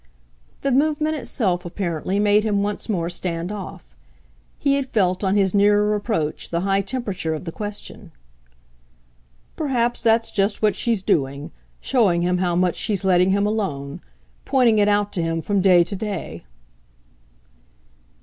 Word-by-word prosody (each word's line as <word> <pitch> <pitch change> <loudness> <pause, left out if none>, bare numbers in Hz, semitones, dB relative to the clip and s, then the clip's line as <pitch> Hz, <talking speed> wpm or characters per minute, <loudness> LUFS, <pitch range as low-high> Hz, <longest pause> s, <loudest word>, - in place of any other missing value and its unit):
The 275 - +1
movement 305 +3 +1
itself, 195 - -1
apparently, 175 0 -3
made 205 0 +3
him 205 -2 0
once 205 +3 -3
more 170 -6 -1
stand 175 0 -3
off. 120 - -9 0.6
He 280 - +1
had 275 -1 -1
felt 185 -5 0
on 190 0 +1
his 195 -3 +2
nearer 205 +1 +3
approach 205 -8 -2
the 170 0 -1
high 195 +1 +1
temperature 200 -7 -3
of 155 - -8
the 165 - -4
question. 205 +3 -6 1.4
"Perhaps 245 -5 -1
that's 225 0 +2
just 200 +1 0
what 210 - +3
she's 230 -5 0
doing: 140 -4 -1 0.3
showing 195 -10 +2
him 180 0 +1
how 175 -2 0
much 180 -1 +1
she's 200 -3 -1
letting 180 0 +4
him 200 +1 +2
alone 155 -11 -3 0.4
pointing 245 -5 +3
it 205 - +3
out 205 0 +1
to 180 - -1
him 165 0 -1
from 200 +4 0
day 180 -2 +5
to 200 - -6
day." 190 - -5
200 Hz, 150 wpm, -22 LUFS, 175-215 Hz, 1.4 s, day